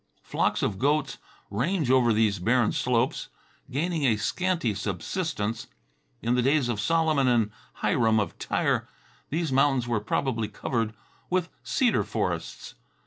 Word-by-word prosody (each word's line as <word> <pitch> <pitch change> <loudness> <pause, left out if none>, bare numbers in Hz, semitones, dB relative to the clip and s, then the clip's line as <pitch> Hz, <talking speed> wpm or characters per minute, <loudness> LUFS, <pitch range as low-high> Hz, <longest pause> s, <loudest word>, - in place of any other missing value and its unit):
Flocks - - 0
of 95 -2 -1
goats 145 +3 +1 0.3
range 140 - 0
over 125 -3 +5
these 105 -3 +2
barren 115 +4 +2
slopes, 125 +1 0 0.4
gaining 160 +4 -1
a 115 -5 +3
scanty 170 - 0
subsistence. 110 - -3 0.6
In 120 +1 +1
the 125 - +3
days 135 0 +2
of 110 -4 -1
Solomon 155 +2 +2
and 115 -4 +2 0.3
Hiram 110 -2 +3
of 105 - -3
Tyre - - 0 0.4
these 160 -1 -1
mountains 135 -2 +3
were 120 -3 +1
probably 115 +1 -1
covered 115 -2 -2 0.3
with 180 -1 0
cedar 245 -4 +2
forests. - - -3
125 Hz, 135 wpm, -27 LUFS, 110-150 Hz, 0.6 s, over